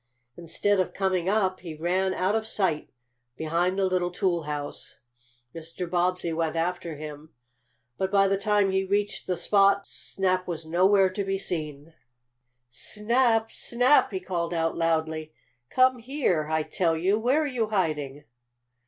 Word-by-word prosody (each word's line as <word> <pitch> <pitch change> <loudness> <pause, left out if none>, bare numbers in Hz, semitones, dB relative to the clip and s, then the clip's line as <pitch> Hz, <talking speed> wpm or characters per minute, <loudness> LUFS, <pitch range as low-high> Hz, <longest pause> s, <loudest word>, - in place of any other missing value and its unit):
Instead 190 +4 0
of 185 - -1
coming 185 -2 0
up 190 -3 +1
he 165 -3 -8
ran 180 +4 0
out 185 +2 0
of 220 0 -1
sight 185 -8 -1 0.5
behind 170 +4 0
the 195 - +2
little 185 -1 0
toolhouse. 165 -6 -3 0.6
Mr. 165 +2 -6
Bobbsey 175 -1 0
went 160 0 -1
after 170 -1 -2
him, 150 +1 -9 0.6
but 190 - 0
by 195 0 +4
the 195 - +2
time 200 0 +2
he 190 0 +1
reached 205 +2 -1
the 180 - -1
spot 200 +2 +3
Snap 185 -1 -2
was 165 -2 -4
nowhere 190 +3 +3
to 200 +2 -3
be 195 0 -1
seen. 155 -5 -5 0.8
"Snap! 225 - +1
Snap!" 245 +4 +3
he 190 - -3
called 175 -2 -3
out 165 0 0
loudly. 160 -1 -1 0.4
"Come 255 -1 +3
here, 230 - -1
I 160 0 +1
tell 165 0 0
you! 190 +6 +1
Where 260 +7 +2
are - - -1
you 250 -6 -1
hiding?" 150 -8 -2
185 Hz, 150 wpm, -26 LUFS, 165-200 Hz, 0.8 s, by